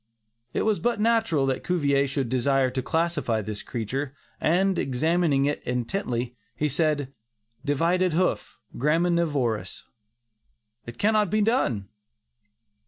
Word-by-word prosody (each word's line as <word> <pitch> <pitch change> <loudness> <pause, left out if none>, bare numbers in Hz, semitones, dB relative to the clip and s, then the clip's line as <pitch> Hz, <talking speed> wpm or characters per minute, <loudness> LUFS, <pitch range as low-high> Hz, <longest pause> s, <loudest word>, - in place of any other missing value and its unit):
It - - -1
was 215 -2 +1
but 240 -3 0
natural 220 -10 +2
that 130 -1 -1
Cuvier 140 -6 +2
should 135 -1 -1
desire 130 +1 +2
to 130 - -2
classify 150 -7 0
this 105 0 -5
creature, 130 +6 -4 0.2
and 185 +3 +2
examining 150 +1 +1
it 145 +1 -1
intently, 125 -1 -2 0.2
he 150 - 0
said, 145 -2 0 0.5
"Divided 170 +5 +1
hoof; 180 +3 0 0.2
graminivorous! 150 - 0 1.0
it 120 0 -8
cannot 215 -1 +2
be 215 +3 +2
done." 165 - +1
145 Hz, 115 wpm, -26 LUFS, 125-175 Hz, 1.0 s, natural